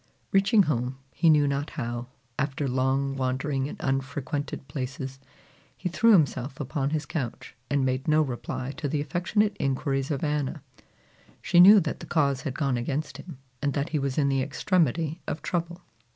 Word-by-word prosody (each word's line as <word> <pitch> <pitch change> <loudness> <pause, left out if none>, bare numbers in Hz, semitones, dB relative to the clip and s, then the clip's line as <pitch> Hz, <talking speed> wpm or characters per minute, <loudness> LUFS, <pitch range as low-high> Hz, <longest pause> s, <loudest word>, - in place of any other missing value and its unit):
Reaching 195 +2 +5
home, 130 -4 -1 0.2
he 165 - +3
knew 150 -2 +5
not 140 +1 -1
how, 120 +1 -4 0.3
after 140 +1 -1
long 135 +2 0
wandering 135 +1 -1
in - - -7
unfrequented 135 +1 -3
places, 135 0 -5 0.6
he 180 - -3
threw 230 +7 +4
himself 135 -6 +2
upon 140 0 -1
his 155 0 -2
couch, 135 -5 -5 0.2
and 140 -2 +2
made 130 0 -1
no 155 0 +4
reply 130 0 -4
to 160 -2 -2
the 150 - 0
affectionate 180 +8 0
inquiries 135 0 -1
of 140 -4 -2
Anna. 150 -3 -1 0.8
She 175 - +3
knew 200 +4 +10
that 155 - -3
the - - -9
cause 140 -5 +1
had 135 -1 -4
gone 140 -5 +1
against 140 +6 -3
him, 170 -7 -10 0.2
and 145 -1 0
that 140 0 -1
he 155 - 0
was 135 -1 -2
in 145 -2 +3
the 135 -1 +1
extremity 160 +2 0
of 155 - -4
trouble. 175 0 -2
140 Hz, 170 wpm, -27 LUFS, 135-155 Hz, 0.8 s, knew